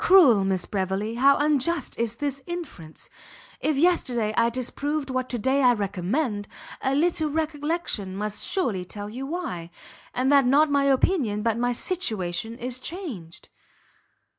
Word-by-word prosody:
"Cruel 285 Hz, -, +7 dB
Miss 190 Hz, -2 st, -1 dB
Beverley! 195 Hz, +2 st, -2 dB
how 275 Hz, +4 st, +5 dB
unjust 300 Hz, +3 st, +1 dB
is 230 Hz, -1 st, 0 dB
this 280 Hz, +1 st, -3 dB
inference! 315 Hz, -, -7 dB, 0.5 s
If 310 Hz, -, +1 dB
yesterday 255 Hz, -9 st, +2 dB
I 235 Hz, 0 st, +3 dB
disapproved 275 Hz, +4 st, -3 dB
what 255 Hz, 0 st, -2 dB
to 245 Hz, -, -1 dB
day 265 Hz, +5 st, +1 dB
I 250 Hz, -2 st, +6 dB
recommend, 205 Hz, -, -2 dB, 0.3 s
a 265 Hz, 0 st, +1 dB
little 315 Hz, 0 st, +1 dB
recollection 300 Hz, -, -2 dB
must 210 Hz, +1 st, -2 dB
surely 230 Hz, -, -1 dB
tell 205 Hz, +3 st, -7 dB
you 260 Hz, +4 st, -5 dB
why; 280 Hz, -, -4 dB, 0.4 s
and 260 Hz, +2 st, +1 dB
that 280 Hz, -3 st, +5 dB
not 290 Hz, +3 st, +4 dB
my 280 Hz, -1 st, +3 dB
opinion, 260 Hz, -, +2 dB
but 230 Hz, -2 st, +1 dB
my 245 Hz, +1 st, 0 dB
situation 225 Hz, -, -2 dB
is 250 Hz, +1 st, -4 dB
changed." 255 Hz, -, -7 dB
255 Hz, 145 wpm, -25 LUFS, 210-295 Hz, 0.5 s, Cruel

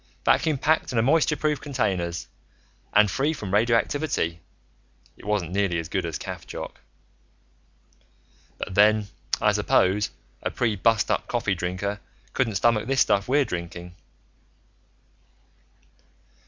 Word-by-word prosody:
Vacuum 155 Hz, -3 st, +3 dB
packed 155 Hz, +4 st, +1 dB
in 115 Hz, -2 st, +1 dB
moisture 155 Hz, +2 st, +3 dB
proof 150 Hz, -2 st, 0 dB
containers, 95 Hz, -, -2 dB, 0.6 s
and 105 Hz, -1 st, +5 dB
free 145 Hz, +4 st, +1 dB
from 100 Hz, -10 st, -6 dB
radioactivity. 115 Hz, -, +1 dB, 0.8 s
It -, -, -16 dB
wasn't 105 Hz, -5 st, -1 dB
nearly 95 Hz, -3 st, +1 dB
as 80 Hz, -1 st, -4 dB
good 95 Hz, -2 st, -1 dB
as 80 Hz, -, -3 dB
caffchoc. -, -, -7 dB, 1.8 s
"But -, -, -5 dB
then, 105 Hz, +1 st, +4 dB, 0.3 s
I -, -, +4 dB
suppose, 100 Hz, +3 st, +2 dB, 0.3 s
a -, -, -1 dB
pre 115 Hz, -3 st, 0 dB
bustup 110 Hz, +2 st, +1 dB
coffee 115 Hz, -5 st, 0 dB
drinker 95 Hz, +3 st, -3 dB, 0.3 s
couldn't 115 Hz, -6 st, 0 dB
stomach 115 Hz, +2 st, +2 dB
this 135 Hz, 0 st, +2 dB
stuff 100 Hz, 0 st, +2 dB
we're 140 Hz, +2 st, +3 dB
drinking." 85 Hz, -2 st, -6 dB
105 Hz, 115 wpm, -25 LUFS, 95-125 Hz, 1.8 s, and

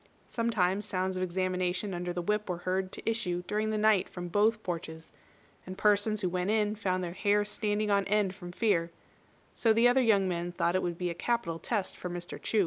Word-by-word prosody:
Sometimes 210 Hz, -4 st, +1 dB
sounds 185 Hz, 0 st, -1 dB
of 185 Hz, -, -2 dB
examination 185 Hz, +1 st, -1 dB
under 175 Hz, 0 st, -3 dB
the 175 Hz, 0 st, -3 dB
whip 210 Hz, +2 st, -1 dB
were 180 Hz, -, -1 dB
heard 185 Hz, 0 st, -1 dB
to -, -, -9 dB
issue 180 Hz, -6 st, -1 dB
during 215 Hz, +3 st, -1 dB
the 215 Hz, -, 0 dB
night 210 Hz, -3 st, +3 dB
from 175 Hz, -1 st, -6 dB
both 215 Hz, +3 st, +2 dB
porches, 160 Hz, -2 st, -5 dB, 0.5 s
and 185 Hz, +1 st, -8 dB
persons 210 Hz, +1 st, +2 dB
who 185 Hz, -, 0 dB
went 180 Hz, +2 st, -1 dB
in 210 Hz, -1 st, +2 dB
found 185 Hz, -3 st, -1 dB
their 170 Hz, -1 st, -4 dB
hair 205 Hz, +2 st, +2 dB
standing 210 Hz, 0 st, -1 dB
on 200 Hz, -1 st, +3 dB
end 205 Hz, -2 st, +1 dB
from 175 Hz, -2 st, -9 dB
fear; 180 Hz, -4 st, +1 dB, 0.6 s
so 225 Hz, -, +2 dB
the 230 Hz, +2 st, +5 dB
other 250 Hz, +2 st, +4 dB
young 205 Hz, -5 st, +3 dB
men 175 Hz, -1 st, -2 dB
thought 170 Hz, 0 st, +1 dB
it 185 Hz, -, +2 dB
would 175 Hz, -1 st, -2 dB
be 180 Hz, -1 st, -2 dB
a -, -, -3 dB
capital 175 Hz, -3 st, -1 dB
test 205 Hz, -2 st, -2 dB
for 180 Hz, -, -6 dB
Mr. 175 Hz, 0 st, -7 dB
Chu. 220 Hz, -, +1 dB
190 Hz, 215 wpm, -30 LUFS, 180-210 Hz, 0.6 s, the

